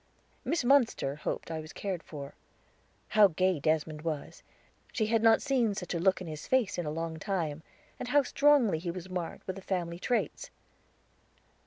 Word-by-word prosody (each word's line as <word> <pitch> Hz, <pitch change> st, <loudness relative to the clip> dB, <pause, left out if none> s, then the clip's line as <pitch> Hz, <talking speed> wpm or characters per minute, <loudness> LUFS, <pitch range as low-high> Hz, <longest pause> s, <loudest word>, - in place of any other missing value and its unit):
'" -, -, -37 dB
Miss 330 Hz, -, 0 dB
Munster 245 Hz, -, +3 dB
hoped 155 Hz, -, -4 dB
I 160 Hz, -, -3 dB
was 155 Hz, -1 st, -9 dB
cared 190 Hz, -4 st, -3 dB
for. 140 Hz, -4 st, -8 dB, 0.8 s
How 215 Hz, -2 st, +7 dB
gay 185 Hz, -1 st, +1 dB
Desmond 155 Hz, +1 st, 0 dB
was! 155 Hz, -3 st, -4 dB, 0.5 s
she 220 Hz, -, 0 dB
had 225 Hz, +1 st, +2 dB
not 225 Hz, 0 st, +5 dB
seen 245 Hz, -7 st, +1 dB
such 180 Hz, -2 st, -4 dB
a 170 Hz, -, -1 dB
look 190 Hz, +2 st, +3 dB
in -, -, -5 dB
his 155 Hz, -2 st, -7 dB
face 230 Hz, -8 st, +1 dB
in 170 Hz, -, -2 dB
a -, -, 0 dB
long 160 Hz, +1 st, -4 dB
time. 165 Hz, -5 st, -2 dB, 0.4 s
And -, -, -4 dB
how 285 Hz, +3 st, +4 dB
strongly 275 Hz, -, +4 dB
he 175 Hz, +1 st, -4 dB
was 185 Hz, +1 st, -6 dB
marked 180 Hz, -2 st, -4 dB
with 190 Hz, 0 st, -4 dB
the -, -, -7 dB
family 175 Hz, -3 st, -3 dB
traits. 240 Hz, +5 st, -1 dB
185 Hz, 185 wpm, -30 LUFS, 160-225 Hz, 0.8 s, How